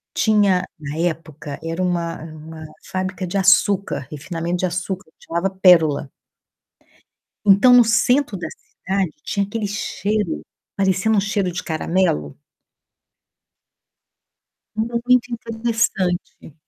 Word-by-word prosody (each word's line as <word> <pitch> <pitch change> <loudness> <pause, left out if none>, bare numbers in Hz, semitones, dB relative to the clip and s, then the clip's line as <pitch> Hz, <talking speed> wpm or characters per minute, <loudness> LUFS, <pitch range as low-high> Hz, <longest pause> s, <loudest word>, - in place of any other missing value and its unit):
Tinha, 205 -4 +3 0.2
na 150 +1 -6
época, 155 -3 -3
era 165 +2 -3
uma 170 -3 -1
uma 155 0 -10 0.3
fábrica 185 0 -3
de 200 +3 -2
açúcar, 190 -5 +3
refinamento 170 +3 -3
de 185 - 0
açúcar, 180 0 -4
chamava 170 +3 -2
Pérola. 170 -7 +4 1.4
Então, 205 +5 +6
no 245 -1 +8
centro 235 +1 +2
da - - -4
cidade, 190 -3 -3
tinha 200 -1 0
aquele 210 +1 -3
cheiro 205 -2 -2 0.3
parecendo 195 +3 +2
um - - +5
cheiro 200 -3 -1
de 175 - -4
caramelo. 155 - -1 2.4
Muito 235 +2 +1
interessante. 225 -8 -2
185 Hz, 105 wpm, -21 LUFS, 165-210 Hz, 2.4 s, no